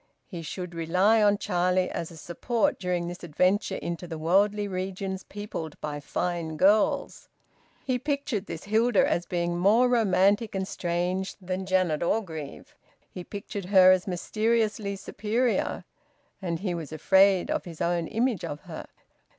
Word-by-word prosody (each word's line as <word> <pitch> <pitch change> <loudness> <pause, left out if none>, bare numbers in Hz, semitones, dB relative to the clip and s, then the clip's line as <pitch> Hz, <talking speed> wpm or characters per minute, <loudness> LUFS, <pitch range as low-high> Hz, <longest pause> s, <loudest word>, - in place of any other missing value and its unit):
He 175 -5 -7
should 175 +2 -6
rely 180 +7 +3
on 205 -1 +4
Charlie 180 -1 +1
as 165 - -4
a 165 - -12
support 215 +8 -1
during 180 -2 -1
this 175 +1 -7
adventure 185 +5 +1
into 170 0 -5
the 165 -1 -6
worldly 200 +6 +2
regions 190 0 -4
peopled 200 -7 -7
by 145 -1 -4
fine 165 +1 -3
girls. 205 +5 +2 0.6
He 255 -1 0
pictured 280 -6 -2
this 160 - -6
Hilda 220 +1 +3
as 175 0 -1
being 175 -1 -1
more 220 +7 +5
romantic 210 -2 +2
and 190 0 -2
strange 180 +2 -2
than 185 0 -4
Janet 185 -5 +1
Orgreave; 170 -6 -3 0.4
he 180 - -7
pictured 200 0 -6
her 185 -1 +7
as 185 +2 +2
mysteriously 215 +2 0
superior. 220 +5 -1 0.6
And 170 -3 -3
he 190 -3 -1
was 165 -3 -6
afraid 190 +4 +4
of - - -1
his 165 -3 -9
own 170 -1 0
image 230 -3 0
of 145 - -5
her. - - -9
185 Hz, 150 wpm, -27 LUFS, 175-205 Hz, 0.6 s, her